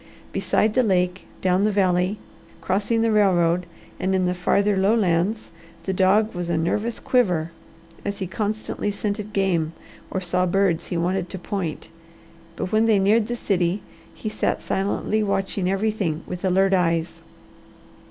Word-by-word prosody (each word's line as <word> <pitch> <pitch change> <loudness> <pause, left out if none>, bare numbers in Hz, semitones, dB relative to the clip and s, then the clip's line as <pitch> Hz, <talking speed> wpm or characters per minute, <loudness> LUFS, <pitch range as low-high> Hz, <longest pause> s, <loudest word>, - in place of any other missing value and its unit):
Beside 215 0 +1
the 255 - +4
lake, 180 -4 0
down 185 +1 +2
the 210 - +3
valley, 185 0 +2 0.4
crossing 210 +4 0
the 230 - +2
railroad, 180 -4 +3 0.3
and 190 +1 0
in 185 -1 +2
the 180 - +1
farther 200 +3 +2
lowlands, 195 0 +1 0.3
the 190 - -2
dog 195 +4 +3
was 175 -1 -4
a 170 - +1
nervous 210 +8 -1
quiver, 180 -10 +1 0.5
as 200 0 -3
he 190 - -3
constantly 210 +2 -3
scented 205 +1 -3
game 180 -6 0 0.4
or 190 - -2
saw 180 0 0
birds 185 -2 +1
he 175 - -2
wanted 180 +1 -1
to 190 - -6
point. 180 -4 -4 0.7
But 185 - -4
when 220 +1 +3
they 220 -2 +4
neared 210 +3 +3
the 240 - -2
city, 185 -3 0 0.3
he - - -8
sat 215 - -1
silently 205 +2 0
watching 195 -2 0
everything 195 -5 -1
with 180 0 -6
alert 190 +1 +3
eyes. 170 -2 0
190 Hz, 150 wpm, -23 LUFS, 180-210 Hz, 0.7 s, the